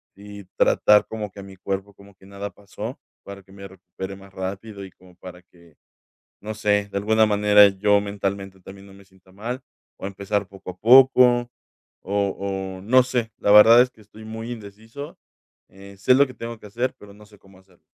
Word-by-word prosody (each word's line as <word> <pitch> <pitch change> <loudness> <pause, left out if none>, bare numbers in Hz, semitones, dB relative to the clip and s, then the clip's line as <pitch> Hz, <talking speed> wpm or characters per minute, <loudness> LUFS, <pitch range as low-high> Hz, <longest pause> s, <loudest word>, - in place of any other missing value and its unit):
si 100 0 -12
tratar 105 0 +4
como 105 -3 -6
que 100 - -11
mi 95 -1 -13
cuerpo 95 +2 -5
como 100 +1 -18
que 95 - -21
nada 100 +1 -7
pasó, 100 -1 -9 0.2
para 100 0 -10
que 95 - -23
me 100 0 -11
recupere 95 +1 -9
más 100 0 -16
rápido, 100 +2 -7
y 95 - -13
como 90 0 -21
para 90 0 -12
que, 85 -3 -23 0.7
no 110 +1 -6
sé, 105 -1 0
de - - -11
alguna 110 +2 +2
manera 105 -1 +5
yo 100 +1 +2
mentalmente 100 -1 -5
también 95 +2 -13
no 95 - -16
me 100 0 -17
sienta 95 -1 -25
mal, 120 +7 -6 0.4
o, - - -7
empezar 100 +1 -3
poco 95 -1 -12
a 90 - -19
poco, 125 +1 +5 0.5
o 100 +1 -1 0.5
o, - - -13
no 130 +5 +5
sé, 125 -3 -3
la - - -1
verdad 110 +3 +8
es 125 - +1
que - - -26
estoy 110 +1 -15
muy 115 +2 -7
indeciso. 110 +5 -10 0.5
Eh, 100 +1 -15
sé 100 +6 +3
lo 140 +2 +4
que 130 - -12
tengo 115 -1 -8
que 105 - -13
hacer, 120 +5 -3
pero 100 -1 -14
no 105 0 -17
sé 105 -1 -21
cómo 95 -1 -21
hacerlo. 95 -2 -27
100 Hz, 200 wpm, -22 LUFS, 95-110 Hz, 0.7 s, verdad